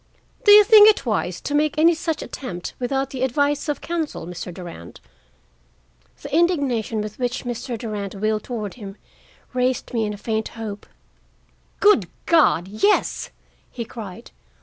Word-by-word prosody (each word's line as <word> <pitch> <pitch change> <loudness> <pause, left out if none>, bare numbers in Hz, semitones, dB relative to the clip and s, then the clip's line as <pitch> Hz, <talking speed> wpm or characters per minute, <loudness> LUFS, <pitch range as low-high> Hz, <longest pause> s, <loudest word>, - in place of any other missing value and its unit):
"Do 410 - +8
you 420 0 +10
think 425 0 +8
it 420 - +1
wise 190 -6 -1
to 290 - -4
make 300 0 +1
any 330 +2 +5
such 325 -1 -3
attempt 180 -10 -7
without 270 +2 -1
the 260 - -5
advice 285 +4 0
of 295 - -2
counsel, 325 - -3
Mr. 180 +1 -7
Durand?" 170 - -10 1.2
The - - -4
indignation 275 - +1
with 210 +2 -7
which 245 0 -2
Mr. 240 0 -4
Durand 210 -4 -5
wheeled 215 +1 -1
toward 215 -6 -5
him 200 -3 -10 0.6
raised 255 0 -1
in 240 - -1
me 215 -1 0
a 205 - -6
faint 220 +1 -2
hope. 215 -3 -8 0.9
"Good 415 0 +4 0.2
God, 290 - +3
yes!" 215 - +1 0.4
he 235 - -6
cried. 210 -6 -9
245 Hz, 150 wpm, -22 LUFS, 210-295 Hz, 1.2 s, you